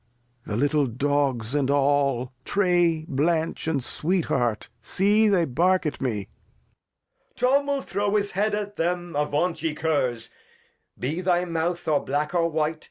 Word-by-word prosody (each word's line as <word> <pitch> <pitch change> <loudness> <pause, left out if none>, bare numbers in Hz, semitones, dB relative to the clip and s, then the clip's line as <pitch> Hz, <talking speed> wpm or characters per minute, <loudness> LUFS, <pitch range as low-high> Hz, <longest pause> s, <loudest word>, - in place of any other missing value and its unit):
\AsiAe. 120 0 -31
Lear. 105 - -3
The - - -1
little 145 +1 +2
Dogs 130 -2 0
and 140 -2 +1
aU, 140 -3 +1
Trey, 175 -4 +2
Blanch, 160 +4 0
and 145 -5 0
Sweet 170 +7 +1
Heart, 115 -4 -1
see 205 - +3
they 190 -5 +3
bark 180 +6 +1
at 150 - -3
me. 110 -7 -2
Edg. - - -41
Tom 275 +3 +2
will 280 -1 -1
throw 205 0 -1
his 205 -1 0
Head 205 +3 0
at 205 -1 -5
'em; 175 0 -1
avaunt, 150 +4 0
ye 160 -2 -1
Curs. 145 -7 -1 0.7
Be 155 +8 -3
thy 180 -1 +1
Mouth, 170 +1 -2
or 150 -2 +2
black, 150 +4 -2
or 170 -1 +2
white. 155 0 -1
160 Hz, 165 wpm, -25 LUFS, 140-180 Hz, 0.7 s, see